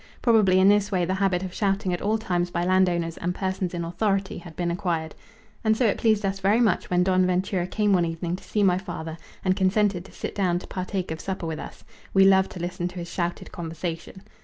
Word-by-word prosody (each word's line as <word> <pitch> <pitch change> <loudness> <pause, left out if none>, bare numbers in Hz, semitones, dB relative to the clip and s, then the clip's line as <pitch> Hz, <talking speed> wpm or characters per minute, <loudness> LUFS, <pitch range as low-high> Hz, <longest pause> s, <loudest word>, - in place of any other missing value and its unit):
Probably 210 -6 +5
in 190 - +5
this 205 0 +4
way 180 -2 +1
the 185 - -1
habit 190 -1 +1
of 185 -1 -5
shouting 195 -2 0
at 175 - -3
all 215 +2 +1
times 180 -5 -1
by 175 0 -1
landowners 180 -3 +2
and 180 +1 -2
persons 190 -2 -2
in 170 -1 -3
authority 195 +2 -1
had 170 -2 -12
been 175 -1 -1
acquired. 170 -3 -2 0.5
And 220 -1 +3
so 250 - +2
it 215 - +1
pleased 215 -2 +2
us 195 0 -1
very 200 +4 +3
much 235 -3 +1
when 180 0 +3
Don 185 0 +3
Ventura 185 0 0
came 210 0 +1
one 175 -2 +3
evening 170 +1 -3
to - - -15
see 210 - 0
my 180 -2 +3
father 160 -4 -6 0.3
and 185 0 +3
consented 195 -1 +2
to - - -14
sit - - -6
down 185 -3 +1
to 180 - -7
partake 185 -1 -4
of 160 - -5
supper 190 -3 -4
with 160 -1 -4
us. - - -9 0.3
We 195 0 +7
loved 190 0 +5
to 180 - -8
listen 175 0 -3
to 180 - -9
his 170 -1 -6
shouted 175 -1 -3
conversation. 165 +2 -6
185 Hz, 235 wpm, -25 LUFS, 175-195 Hz, 0.5 s, We